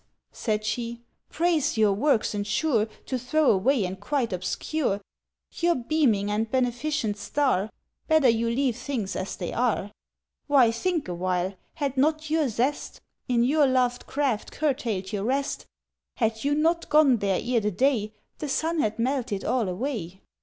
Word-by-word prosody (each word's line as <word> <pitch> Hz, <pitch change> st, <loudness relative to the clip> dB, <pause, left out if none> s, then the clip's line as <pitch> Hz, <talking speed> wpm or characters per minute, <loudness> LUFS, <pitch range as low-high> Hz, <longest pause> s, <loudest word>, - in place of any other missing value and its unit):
said 215 Hz, -2 st, -2 dB
she. 235 Hz, +2 st, -3 dB, 0.3 s
"Praise 330 Hz, -7 st, +1 dB
your 215 Hz, -2 st, +4 dB
works 225 Hz, +1 st, +1 dB
ensure 215 Hz, +3 st, +1 dB, 0.2 s
To 255 Hz, -, -2 dB
throw 280 Hz, +4 st, +3 dB
away, 215 Hz, +3 st, +2 dB
and 185 Hz, +1 st, -5 dB
quite 235 Hz, +1 st, -1 dB
obscure 200 Hz, -, -1 dB, 0.6 s
"Your 345 Hz, 0 st, +2 dB
beaming 235 Hz, -7 st, +1 dB
and 220 Hz, +2 st, -1 dB
beneficent 245 Hz, -2 st, 0 dB
star? 220 Hz, -3 st, 0 dB, 0.4 s
Better 315 Hz, -4 st, +4 dB
you 230 Hz, 0 st, +1 dB
leave 250 Hz, 0 st, +1 dB
things 245 Hz, -5 st, -3 dB
as 190 Hz, -, -3 dB
they 175 Hz, -, -5 dB
are! 230 Hz, -4 st, 0 dB, 0.6 s
"Why, 265 Hz, -5 st, +5 dB
think 330 Hz, -, -1 dB
awhile. 180 Hz, +1 st, -1 dB, 0.2 s
Had 280 Hz, -4 st, -2 dB
not 310 Hz, +2 st, +1 dB
your 315 Hz, -2 st, +2 dB
zest 250 Hz, +6 st, -2 dB, 0.3 s
In 240 Hz, -2 st, +2 dB
your 290 Hz, +3 st, +4 dB
loved 250 Hz, -1 st, +1 dB
craft 270 Hz, -7 st, -1 dB
curtailed 230 Hz, -10 st, -2 dB
your 200 Hz, -1 st, -1 dB
rest— 275 Hz, +5 st, -1 dB, 0.5 s
"Had 225 Hz, -2 st, -1 dB
you 285 Hz, +1 st, +2 dB
not 330 Hz, +3 st, +1 dB
gone 300 Hz, -5 st, +5 dB
there 195 Hz, -3 st, 0 dB
ere 245 Hz, -1 st, +1 dB
the 210 Hz, -1 st, 0 dB
day 215 Hz, +1 st, +1 dB, 0.3 s
The 300 Hz, -, -4 dB
sun 325 Hz, +4 st, 0 dB
had 215 Hz, -6 st, 0 dB
melted 240 Hz, -4 st, -1 dB
all 235 Hz, -7 st, +1 dB
away!" 190 Hz, -, -4 dB
245 Hz, 155 wpm, -26 LUFS, 210-285 Hz, 0.6 s, Why